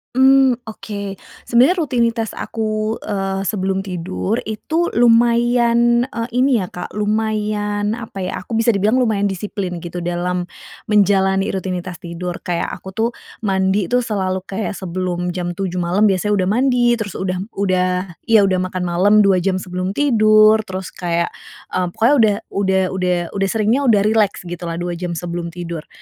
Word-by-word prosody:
Mmm, 265 -1 +5
oke. 200 -2 -6 0.3
Sebenernya 265 +10 +4
rutinitas 235 -6 0
aku, 215 0 -2
eee, 195 -2 -3
sebelum 190 -2 -1
tidur, 190 +3 -3
itu 315 +11 -2
lumayan, 235 0 +4
eee, 230 -2 -4
ini 255 -2 +3
ya, 185 - -3
Kak, 180 - -7
lumayan, 210 0 -1
apa 220 -4 -8
ya, 185 0 -4
aku - - -17
bisa 230 -2 +3
dibilang 215 +6 +2
lumayan 215 -5 +1
disiplin 190 -2 -4
gitu 175 +1 -6
dalam 175 +1 -1 0.5
menjalani 195 -1 +3
rutinitas 185 -2 -3
tidur. 175 +1 -5
Kayak 175 -1 -2
aku 190 - -10
tuh 225 +4 0 0.3
mandi 190 -2 +1
tuh, 245 0 +1
selalu 190 -4 -2
kayak 200 +1 -4
sebelum 180 -1 -3
jam 175 -1 -4
07.00 185 -2 -3
malem 180 +4 +1
biasanya 205 +3 0
udah - - -1
mandi, 250 -2 +3
terus 205 -4 -5
udah 185 -1 -2 0.2
udah 185 -1 0 0.2
iya 220 -3 +6
udah 185 -2 +2
makan 185 -1 -4
malem 180 +4 +2
2 190 -2 +4
jam 185 +1 0
sebelum 185 +1 -4
tidur. 215 -5 +5
Terus 185 0 -5
kayak, 170 -1 -1 0.4
eee, 180 -1 0
pokoknya 225 +9 +2
udah 210 -2 +4 0.2
udah 190 -1 +1
udah 180 -1 0
udah 195 -1 0
seringnya 220 +5 +1
udah 205 -3 +4
rileks 215 -3 +1
gitulah, 175 -1 -5
2 175 +1 -3
jam 175 0 -4
sebelum 170 0 -4
tidur. 170 -2 -6
195 Hz, 155 wpm, -19 LUFS, 180-220 Hz, 0.5 s, iya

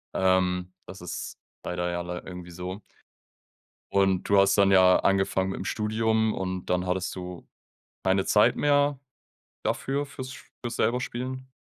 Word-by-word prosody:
Ähm, 90 -1 +1
das 95 0 -10
ist 90 - -6 0.3
leider 90 0 -2
ja 85 0 -2
lei 90 0 -5
irgendwie 90 -1 -8
so. 90 +3 -6 1.1
Und 95 -2 +2
du 100 - +6
hast 100 0 +5
dann 100 -1 +5
ja 95 -1 +6
angefangen 95 -1 +1
mitm 95 - -4
Studium 110 +1 +1
und 95 -2 -4
dann 90 0 +1
hattest 90 0 -1
du 90 -1 -8 0.6
keine 95 0 +2
Zeit 105 - +4
mehr 145 -1 +2 0.7
dafür, 140 +2 -1
fürs 130 -1 -7
sch 130 - -12 0.2
fürs 120 -1 -4
selber 125 +2 +1
Spielen? 130 +2 -5
95 Hz, 150 wpm, -27 LUFS, 90-110 Hz, 1.1 s, du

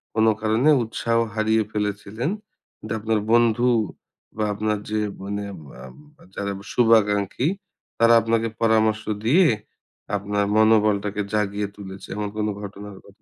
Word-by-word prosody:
কোনো 110 0 +4
কারণে 110 +6 +2
উৎসাহ 115 +1 -1 0.2
হারিয়ে 110 0 +2
ফেলেছিলেন, 105 +5 -3 0.5
কিন্তু 110 0 -6
আপনার 110 0 0
বন্ধু 120 +1 +4 0.7
বা 110 - 0
আপনার 105 +1 -1
যে, 110 - 0 0.2
মানে 100 +1 -4 0.3
বাবা 150 - -14
যারা 100 0 -3 0.2
শুভাকাঙ্খী, 110 0 +3 0.5
তারা 115 0 +6
আপনাকে 115 +1 0
পরামর্শ 110 -1 +2 0.2
দিয়ে, 165 +9 +5 0.7
আপনার 100 0 -1
মনোবলটাকে 105 -2 +3
জাগিয়ে 105 -1 0
তুলেছে? 95 -1 -9
এমন 105 -1 -2
কোন 105 0 0
ঘটনার 100 0 -9
কথা 100 +2 -20
110 Hz, 125 wpm, -23 LUFS, 105-115 Hz, 0.7 s, তারা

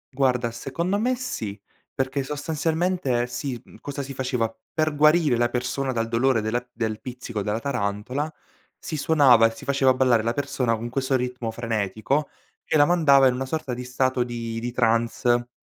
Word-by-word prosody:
Guarda, 125 -3 +1
secondo 170 - -2
me 250 +3 +1
sì, 110 - -5 0.3
perché 135 +1 -1
sostanzialmente, 150 -1 -1
sì, 125 0 -4
mhmm, - - -16
cosa 140 0 -5
si 135 0 -7
faceva: 125 -4 -1 0.2
per 155 -1 0
guarire 150 -3 +4
la 120 +1 +2
persona 130 +2 -2
dal 115 -2 -1
dolore 115 +1 +2
della 120 +3 -1
del 110 -2 -3
pizzico 125 -4 -5
della 105 +3 -1
tarantola, 125 +4 -2 0.5
si 155 - -6
suonava 135 -7 +5
e 115 - -6
si - - -11
faceva 135 -1 +3
ballare 125 -3 +3
la 115 +1 -1
persona 135 -4 0
con 115 +2 -5
questo 130 +1 0
ritmo 125 -2 -2
frenetico 115 +5 -1 0.3
che 155 - +1
la 145 - +6
mandava 140 -6 +5
in 125 - +2
una 130 +1 -3
sorta 145 -4 -3
di 125 +1 -5
stato 130 0 0
di 115 -2 -4
di 120 +1 -3
trance, 120 +1 +1
125 Hz, 175 wpm, -24 LUFS, 115-140 Hz, 0.5 s, la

